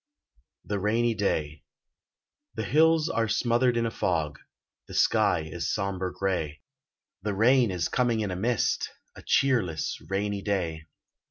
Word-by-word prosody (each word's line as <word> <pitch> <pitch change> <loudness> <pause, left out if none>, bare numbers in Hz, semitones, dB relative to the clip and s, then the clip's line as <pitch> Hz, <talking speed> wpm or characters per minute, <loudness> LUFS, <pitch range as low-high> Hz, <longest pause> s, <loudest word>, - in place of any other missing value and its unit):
*THE 105 -1 -2
RAINY 115 +4 +1
DAY* 80 -8 -2 0.9
The - - -2
hills 160 +1 +4
are 115 -7 0
smothered 120 +2 +2
in 115 - +1
a 115 - -1
fog, 80 -8 -1 0.5
The - - -9
sky - - +3
is 80 +1 -4
somber 95 -2 -2
grey, 90 -7 -2 0.6
The 105 0 -2
rain 120 +3 +4
is 90 -3 -1
coming 120 -3 +1
in 100 -3 -2
a - - -3
mist, 115 +5 0 0.3
A - - -11
cheerless 100 - +1
rainy 100 +1 -1
day. 85 -6 -2
100 Hz, 140 wpm, -27 LUFS, 90-120 Hz, 0.9 s, hills